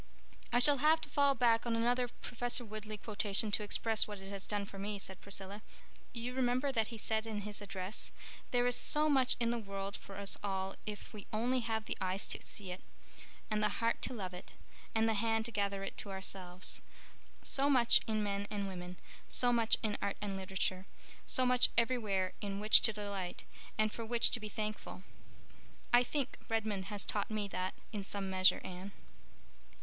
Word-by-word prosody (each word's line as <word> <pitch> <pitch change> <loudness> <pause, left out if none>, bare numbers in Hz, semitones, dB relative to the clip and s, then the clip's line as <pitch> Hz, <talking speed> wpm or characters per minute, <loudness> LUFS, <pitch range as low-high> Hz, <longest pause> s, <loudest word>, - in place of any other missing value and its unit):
"I 240 - +4
shall 280 +2 +8
have 310 +3 +5
to - - -4
fall 280 -1 +3
back 235 -2 +3
on 230 - +1
another 245 +2 +2
Professor 245 0 -1
Woodleigh 215 0 -6
quotation 210 0 +2
to 200 - +2
express 220 +1 +1
what 210 -1 -6
it 195 0 -9
has 195 -1 -4
done 205 -1 -2
for 195 0 -10
me," 205 +1 -3
said 190 -1 -7
Priscilla. 200 +1 -5 0.5
"You 240 +1 -4
remember 255 +2 +1
that 225 -4 +1
he 230 - -7
said 220 +1 -1
in 215 -2 -3
his 210 0 -3
address, 195 0 -4 0.4
'There 245 -1 +2
is 245 0 +4
so 300 +4 +2
much 260 -3 +4
in 235 -1 +2
the 240 - -1
world 200 -1 -5
for 195 - -10
us 200 -1 +1
all 190 -1 -2
if 210 +1 -7
we 205 -2 -9
only 245 +4 +1
have 225 -2 -2
the - - -4
eyes 190 +1 0
to - - -2
see 195 -4 -3
it, 180 - -7 0.7
and 210 0 +1
the 210 -1 0
heart 230 0 0
to - - 0
love 190 -4 -5
it, 180 - -10 0.4
and 225 0 +3
the 225 - +2
hand 225 +1 +1
to 235 - -5
gather 200 -2 -1
it 195 - -6
to 205 - -5
ourselves—so 190 +8 -3
much 245 -4 +6
in 215 -1 0
men 200 0 -2
and 205 -2 -3
women, 180 -1 -7 0.3
so 245 -1 +4
much 230 -2 +4
in 215 -2 -1
art 200 -1 -2
and 200 -2 -3
literature, 190 0 -2 0.4
so 255 - +3
much 250 0 +5
everywhere 215 -6 +1
in 200 -1 -3
which 215 +1 +8
to - - +3
delight, 200 -4 -5 0.3
and 215 0 +2
for 230 - -6
which 235 +1 +5
to 245 - +4
be 215 -1 -6
thankful.' 215 -3 -5 0.9
I 240 - +8
think 265 +1 -2
Redmond 215 -4 -1
has 205 0 -2
taught 205 -1 -1
me 215 -2 -2
that 185 -1 -3 0.2
in 205 -2 -3
some 195 -1 -3
measure, 185 0 +4
Anne." 185 +2 -7
210 Hz, 195 wpm, -34 LUFS, 195-235 Hz, 0.9 s, shall